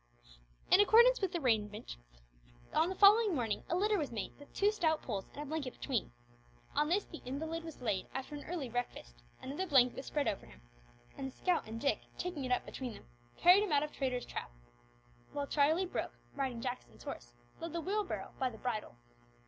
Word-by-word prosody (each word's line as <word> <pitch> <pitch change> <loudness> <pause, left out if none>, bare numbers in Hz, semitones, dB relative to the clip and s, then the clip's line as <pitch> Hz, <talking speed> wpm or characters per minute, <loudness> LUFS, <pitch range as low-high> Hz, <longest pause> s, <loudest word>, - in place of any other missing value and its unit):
In 390 - +9
accordance 470 +4 +7
with 385 -3 +1
this 345 - -1
arrangement, 210 - 0 0.8
on 335 - +3
the 380 - -3
following 410 0 +7
morning 230 -6 -1
a 340 - +1
litter 415 +2 +2
was 290 -5 -2
made 220 -4 -4
with 285 - -14
two 410 +1 +3
stout 320 -7 +1
poles 200 -5 -3
and 295 - -6
a - - -7
blanket 290 -3 -3
between. - - -2 0.6
On 300 - +2
this 390 +4 +2
the 325 - -10
invalid 320 +6 -4
was 320 -6 -9
laid 205 -5 0
after 265 +3 -5
an 290 - -6
early 330 -6 -3
breakfast; 220 - -5 0.2
another 290 +9 -3
blanket 255 -5 +5
was 265 - -6
spread 290 -2 0
over 200 - -2
him, - - -15 0.6
and 270 - -3
the 265 - -11
scout 360 -9 +1
and 225 +1 -5
Dick, 275 +1 +1 0.2
taking 345 -7 -3
it 255 - -3
up 250 - +2
between 250 -4 -5
them, - - -13 0.3
carried 365 +3 +7
him 415 -5 -1
out 290 -1 +4
of 300 - -4
Traitor's 255 -3 -2
Trap, - - -5 0.8
while 285 - -1
Charlie 310 +6 +3
Brooke, 365 - -4 0.2
riding 260 -4 -2
Jackson's 250 0 -5
horse, - - -7 0.2
led 335 - -5
the 340 - -2
Wheelbarrow 400 +3 -2
by 260 - +2
the 225 - -11
bridle. 220 - -3
285 Hz, 200 wpm, -34 LUFS, 245-350 Hz, 0.8 s, In